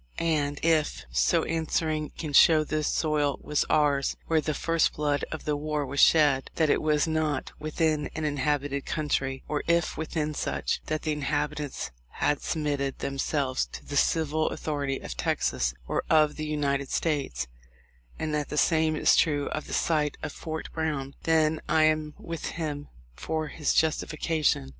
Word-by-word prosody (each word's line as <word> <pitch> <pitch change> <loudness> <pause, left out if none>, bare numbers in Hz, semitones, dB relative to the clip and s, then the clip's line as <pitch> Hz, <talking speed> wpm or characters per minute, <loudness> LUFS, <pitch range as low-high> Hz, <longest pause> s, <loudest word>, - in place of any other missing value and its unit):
And 145 -3 0
if, 160 -2 +1
so - - +3
answering, 160 -1 -1
he - - -19
can 155 -3 -4
show 155 +2 +7
the 155 0 -1
soil 150 -2 +1
was 150 - 0
ours 140 -2 +2
where 160 -1 +2
the 155 0 -2
first 165 +1 +1
blood 145 -1 0
of 160 - -6
the 150 - +1
war 150 0 -2
was 140 +1 -4
shed; 145 -4 +5
that 155 -3 +3
it - - +2
was 150 0 +2
not 155 -3 -1
within 155 0 0
an 160 - -2
inhabited 145 -1 -1
country, 135 -4 -1
or 150 0 -1
if 170 0 +1
within 155 -1 -2
such; - - -2
that 155 0 -2
the 155 - 0
inhabitants 150 - -2 0.2
had 145 - 0
submitted 145 -3 -1
themselves 135 -1 -1
to - - -8
the 145 - -6
civil 155 +1 +2
authority 140 -3 -2
of 60 - -7
Texas - - 0 0.2
or - - -1
of 155 -2 +4
the 155 0 -4
United 140 -3 -1
States; 140 - -1 0.7
and 155 -1 -3
that 150 -1 -1
the 150 - -4
same 160 +1 +3
is - - +4
true 145 -3 +2
of 155 - -4
the - - -9
site 150 -3 +1
of 155 - -3
Fort 160 +1 -6
Brown, 150 -4 -2
then 160 -1 +3
I 160 - +4
am 155 -1 +1
with 165 -2 -6
him 150 -3 -4 0.3
for 155 - -3
his 150 +1 -1
justification 155 - +1
150 Hz, 165 wpm, -27 LUFS, 145-155 Hz, 0.7 s, show